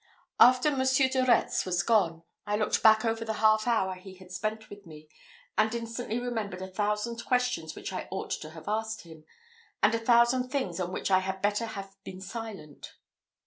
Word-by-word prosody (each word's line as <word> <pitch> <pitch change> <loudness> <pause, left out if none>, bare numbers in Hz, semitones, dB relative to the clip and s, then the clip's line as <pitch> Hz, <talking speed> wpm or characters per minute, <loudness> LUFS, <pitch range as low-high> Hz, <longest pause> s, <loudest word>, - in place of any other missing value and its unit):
After 255 +5 +6
Monsieur 260 0 +3
de 260 0 +1
Retz 245 -2 +2
was 175 -2 0
gone, 175 -7 +2 0.2
I 205 - +1
looked 215 0 0
back 220 +1 +6
over 225 0 0
the 220 -1 -3
half 215 +1 +3
hour 205 -6 +1
he 185 +1 -12
had 185 -1 -15
spent 215 +3 -4
with 205 -2 -13
me, 155 -1 -13 0.5
and 220 +2 +2
instantly 230 0 -4
remembered 220 -6 -4
a - - -5
thousand 210 +4 -2
questions 250 -11 0
which - - -6
I 185 - -4
ought 190 - -5
to 155 - -4
have 160 +1 -12
asked 220 +1 -2
him, 160 -2 -14 0.6
and 210 +1 +5
a 230 - +1
thousand 240 +2 +3
things 250 -11 -2
on 180 -1 -2
which 190 - -3
I 185 - +6
had 190 0 -4
better 210 +3 +1
have 195 -3 -7
been 185 -1 -9
silent. 195 -7 -8
215 Hz, 190 wpm, -29 LUFS, 185-235 Hz, 0.6 s, After